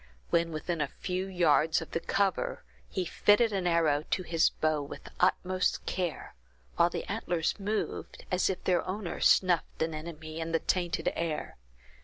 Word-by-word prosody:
When 170 0 +2
within 160 +1 -2
a 145 - +1
few 185 +5 -3
yards 165 -4 +3
of - - -8
the - - 0
cover, 195 +2 0 0.3
he 185 - -2
fitted 210 +5 +3
an 190 -2 0
arrow 160 -4 +3
to 185 - 0
his 165 -1 +3
bow 155 -1 0
with 140 - -8
the - - -12
utmost 185 0 +1
care, 180 -4 -3 0.4
while - - +4
the - - -4
antlers 170 +1 -1
moved, 210 +2 -3
as 180 +1 +2
if 190 - -3
their 180 -2 +2
owner 185 -1 -4
snuffed 175 -3 +3
an 160 0 -2
enemy 155 0 -7
in 165 0 -3
the 165 - +3
tainted 175 -1 0
air. 165 -2 -3
170 Hz, 170 wpm, -30 LUFS, 160-185 Hz, 0.4 s, while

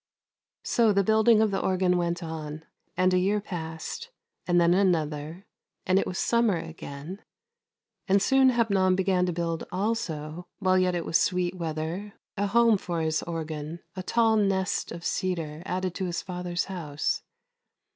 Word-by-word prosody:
So 230 -3 +3
the 200 0 +3
building 220 +2 +5
of 220 -2 +2
the 195 - 0
organ 185 -1 +2
went 175 0 -1
on, 155 -1 -6 0.3
and 185 0 +3
a 180 - +4
year 200 +3 +2
passed, 170 - -6 0.4
and 175 -1 +4
then 170 0 +4
another, 165 -2 0 0.4
and 185 +1 +3
it - - -1
was 185 - -4
summer 235 -5 +2
again, 160 +3 -8 0.9
and 195 0 +4
soon 265 +5 +4
Hepnon 200 -6 +2
began 185 -1 +2
to - - 0
build 165 -1 -2
also 175 -5 -3
— - - -60
while 185 -1 +3
yet 180 -1 +2
it 170 - -2
was 165 - +3
sweet 180 -1 +1
weather 170 +4 -4
— - - -66
a 205 0 0
home 230 0 +4
for 170 -3 -3
his 160 0 0
organ, 160 -1 -5
a 185 - -4
tall 225 +3 +2
nest 195 -3 0
of 170 +1 -7
cedar 165 -4 -2
added 185 -1 -2
to 190 - -3
his 175 -1 -3
father's 180 -1 -3
house. 155 -6 -2
180 Hz, 165 wpm, -27 LUFS, 165-195 Hz, 0.9 s, building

